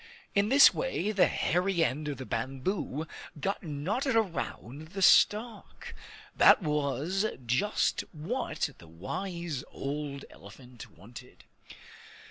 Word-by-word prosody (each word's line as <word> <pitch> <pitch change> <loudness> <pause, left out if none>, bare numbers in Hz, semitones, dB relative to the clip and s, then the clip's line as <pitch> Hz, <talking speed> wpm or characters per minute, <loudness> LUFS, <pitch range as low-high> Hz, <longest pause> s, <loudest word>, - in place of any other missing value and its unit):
In 200 +1 +2
this 275 +3 +8
way - - -2
the 200 -3 +4
hairy 180 0 +1
end 150 +2 -3
of 145 - -4
the 130 - -7
bamboo 135 - -3 0.3
got 195 +6 -2
knotted 195 - -2
around 160 - -3
the 195 - -4
stalk. 215 +4 +2 0.4
That - - +6
was 150 - 0 0.2
just 130 - +1
what 160 - -3
the 85 - -14
wise 165 - -5
old 140 0 -5
elephant 125 -3 -13
wanted. 120 +4 -14
160 Hz, 110 wpm, -29 LUFS, 135-200 Hz, 0.4 s, this